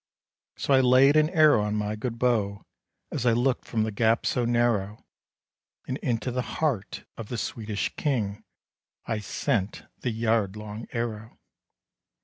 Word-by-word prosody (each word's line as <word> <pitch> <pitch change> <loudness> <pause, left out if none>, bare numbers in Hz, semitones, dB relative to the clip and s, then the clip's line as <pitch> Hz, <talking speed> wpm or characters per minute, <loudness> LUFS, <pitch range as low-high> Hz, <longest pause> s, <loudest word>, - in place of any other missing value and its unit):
So 140 - +1
I 135 - +6
laid 130 +3 +5
an 155 0 +4
arrow 155 - +5
on 105 0 -1
my 105 0 -1
good 115 +2 -4
bow, 110 -5 0 0.5
As 135 - -2
I 115 - +5
looked 125 +2 +1
from 110 -2 0
the 110 - -2
gap 115 +2 +2
so 125 - +1
narrow; 115 -4 0 0.8
And 130 - -2
into 125 0 -1
the 125 +1 -1
heart 125 -7 -2
of 115 -2 -7
the 120 - -3
Swedish 110 -2 -3
King 110 -9 -1 0.6
I 110 - -2
sent 105 -1 -2 0.2
the 125 - -2
yard 110 -3 0
long 105 +1 -7
arrow. 115 -1 -4
115 Hz, 150 wpm, -26 LUFS, 105-125 Hz, 0.8 s, I